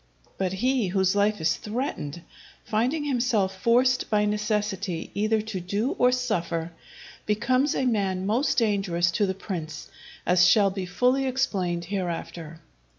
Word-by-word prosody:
But 190 -1 0
he 245 +2 +1
whose 190 +1 +1
life 205 +1 +2
is 160 +1 +1
threatened, 210 - -4 0.4
finding 250 +8 0
himself 235 -9 0
forced 255 +2 +3
by 210 -1 +2
necessity 210 -4 -2
either 215 +1 +1
to 215 -3 -4
do 200 +8 -1
or 250 0 +5
suffer, 175 -10 -1 0.6
becomes 255 +6 +1
a 265 - 0
man 195 -6 0
most 265 +6 +1
dangerous 195 -7 +1
to 200 +4 +1
the 190 - -2
prince, 165 -6 -6 0.4
as 180 0 +5
shall 200 +1 +5
be 190 -1 -4
fully 250 +8 +1
explained 185 -10 -1
hereafter. 170 -3 -5
205 Hz, 140 wpm, -26 LUFS, 180-240 Hz, 0.6 s, or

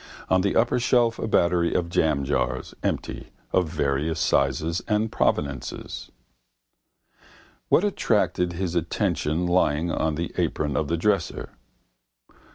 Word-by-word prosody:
On 95 0 +4
the 100 +1 0
upper 120 +2 +3
shelf 120 -1 +2
a - - -2
battery 85 -4 +2
of 85 - +1
jamjars 75 -4 0
(empty) - - -3 0.2
of 90 -4 +2
various 75 0 -1
sizes 70 +6 +1
and 110 0 +1
proveniences. 70 -4 -2 1.6
What - - +4
attracted 105 - +1
his 90 0 -3
attention 85 -1 0
lying 85 -2 +2
on 80 -1 0
the 85 +2 -4
apron 75 -3 -1
of 75 +3 0
the 85 - 0
dresser? 100 0 -1
85 Hz, 120 wpm, -25 LUFS, 75-95 Hz, 1.6 s, On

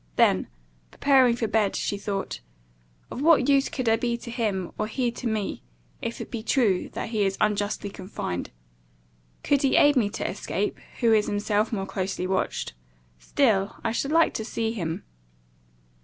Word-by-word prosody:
Then, - - +3 0.4
preparing 260 - +4
for 235 -2 -1
bed, 215 -2 +1
she - - -1
thought, 200 - -3 0.7
"Of - - -5
what 320 -1 +5
use 275 -1 +4
could 255 -3 -3
I 225 0 +4
be 235 0 -1
to 235 0 -9
him, 210 -7 -1
or 215 - 0
he 240 +2 -1
to 240 +1 -5
me, 215 -3 -2 0.4
if - - -4
it - - -7
be 230 - -3
true 220 -5 +1
that - - -4
he 215 -3 +1
is 195 -1 0
unjustly 205 -1 0
confined? 185 - -5 0.9
Could 285 -1 +2
he 270 - +3
aid 290 0 +6
me 225 -6 +3
to 215 - -3
escape, - - -2 0.2
who 230 -2 +5
is 210 -1 +3
himself 205 +1 0
more 195 -4 -2
closely 190 -1 -3
watched? 190 - -1 0.5
Still 205 - +1
I - - 0
should 275 +5 -1
like 330 0 +4
to 220 - -3
see 225 0 -2
him." 170 -8 -3
220 Hz, 170 wpm, -26 LUFS, 200-245 Hz, 0.9 s, aid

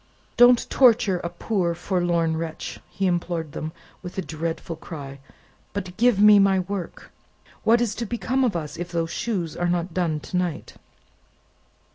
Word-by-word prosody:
"Don't 245 0 +6
torture 230 -7 +4
a 170 - -4
poor 175 -1 -1
forlorn 175 -3 0
wretch," 160 0 -5
he 195 - -2
implored 175 -3 -1
them, 155 +3 -5 0.3
with 180 0 -9
a 190 - -1
dreadful 165 +1 -4
cry; 140 -4 -9 0.5
"but 185 -3 -5
give 240 -2 +3
me 210 0 +8
my 195 -1 +4
work! 190 -1 -6 0.5
What 235 +1 +4
is 230 -3 0
to 235 - -2
become 250 +4 0
of 240 -7 +1
us, 155 -3 -4
if 175 0 -5
those 165 -1 -1
shoes 190 -8 -2
are 175 0 0
not 175 0 -1
done 165 -4 0
to 180 - -4
night?" 180 -4 -3
180 Hz, 160 wpm, -24 LUFS, 165-205 Hz, 0.5 s, me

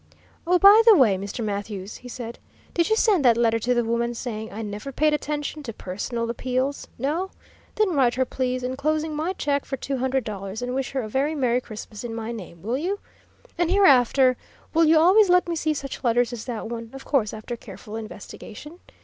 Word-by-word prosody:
"Oh, 360 +1 +5
by 400 +4 +8
the 445 - +10
way, 230 -9 +5
Mr. 200 +4 -4
Mathews," 200 -1 -4
he 250 - -11
said, 235 -1 -7 0.3
"did 340 +2 +1
you 440 - +4
send 415 -8 +3
that 235 -3 +5
letter 230 -1 +2
to 245 +3 +1
the 240 - +2
woman, 235 +1 -1
saying 220 -2 -5
I 220 +3 -5
never 210 +6 -6
paid 305 +3 +2
attention 300 0 -3
to 240 -6 -6
personal 230 +6 -4
appeals? 255 +3 -2
No? 310 +9 -1 0.5
Then 425 -4 +2
write 260 -5 +3
her, 260 0 +1
please, 255 0 -2
enclosing 305 +4 -1
my 320 +5 -1
check 285 -5 -1
for 270 - -4
two 270 +1 -3
hundred 260 +1 0
dollars, 200 +1 -5
and 250 0 -3
wish 265 -1 -2
her 265 -2 -1
a - - -5
very 275 +7 0
Merry 250 -3 +1
Christmas 215 -2 -9
in 230 -2 -5
my 225 0 -4
name, 180 -7 -9
will 240 +5 -1
you? 375 +6 -1 0.6
And 345 -1 +2
hereafter 265 - +5 0.4
will 330 +1 +5
you 320 +1 +5
always 375 +5 +6
let 360 0 +4
me 340 - -1
see 310 -1 0
such 275 -1 -6
letters 240 0 +2
as 225 -2 -6
that 235 -4 -4
one 230 0 -6
of 270 - -10
course 240 -8 +1
after 220 +2 -6
careful 220 -2 -10
investigation? 225 - -9
255 Hz, 210 wpm, -24 LUFS, 230-300 Hz, 0.6 s, the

